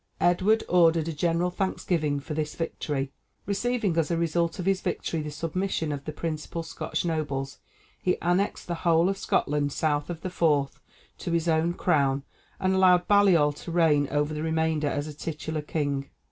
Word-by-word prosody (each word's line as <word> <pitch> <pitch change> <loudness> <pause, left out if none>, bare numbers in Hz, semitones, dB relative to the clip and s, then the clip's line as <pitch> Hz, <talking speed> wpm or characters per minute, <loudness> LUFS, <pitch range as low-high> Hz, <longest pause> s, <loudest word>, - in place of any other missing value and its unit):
Edward 190 +5 +3
ordered 165 -2 +4
a 165 - -2
general 170 +3 0
thanksgiving 170 -6 -1
for 150 +3 -6
this 150 0 -3
victory. 145 -4 -3 0.3
Receiving 210 -2 0
as 165 -2 +2
the 170 - 0
result 170 0 0
of 180 - -4
his 195 -1 +2
victory 165 - -2
the 150 - -5
submission 165 +1 -2
of 140 -1 -5
the 155 - -3
principal 160 +1 -4
Scotch 165 - -4
nobles, 145 -5 -2 0.4
he 180 - +1
annexed 180 +4 0
the 175 - -3
whole 170 +1 +4
of 195 - -1
Scotland 145 0 0
south 145 +1 0
of 170 -2 -5
the 185 - -4
Forth 150 -6 +1 0.4
to 170 - -3
his 170 0 +1
own 165 +1 +2
crown, 140 -5 +1 0.4
and 190 0 +1
allowed 180 -2 +4
Baliol 185 -8 +5
to 170 - -7
reign 155 -4 +3
over 145 +1 0
the 150 - -3
remainder 160 -1 0
as 145 +1 -3
titular 155 0 -4
king. 145 -2 -2
165 Hz, 175 wpm, -27 LUFS, 150-175 Hz, 0.4 s, Baliol